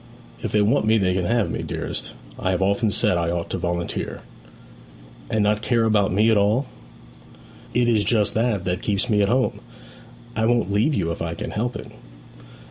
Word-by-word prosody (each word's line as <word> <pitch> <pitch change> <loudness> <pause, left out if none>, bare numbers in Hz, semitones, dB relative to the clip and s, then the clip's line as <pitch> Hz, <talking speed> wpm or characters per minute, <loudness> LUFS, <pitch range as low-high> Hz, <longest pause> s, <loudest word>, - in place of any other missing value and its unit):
'If 110 - -3
they 105 -1 +3
want 110 +1 +2
me 110 +1 +4
they 95 -3 +2
can 90 -1 -1
have 115 +1 +1
me, - - -3
dearest. - - -5 0.3
I - - -1
have 95 0 0
often 100 +3 +2
said 90 -3 +1
I 85 0 0
ought 85 0 -3
to 95 - -2
volunteer.' 85 -1 -3 1.1
'And 110 -1 +1
not 105 +1 +1
care 115 0 +1
about 105 -4 +2
me 105 +4 +3
at 110 - +4
all?' 105 +7 +2 1.1
'It 120 0 +3
is 110 -3 +3
just 105 -2 +2
that 110 -5 0
that 90 0 -1
keeps 105 +4 -1
me 105 -1 +3
at 100 - +2
home. 130 +1 +1 0.8
I 110 0 +1
won't 120 -5 +1
leave 110 +9 +2
you 85 -6 0
if 80 - -5
I 85 0 -3
can - - -5
help 120 +3 -2
it.' - - -8
105 Hz, 200 wpm, -23 LUFS, 95-115 Hz, 1.1 s, me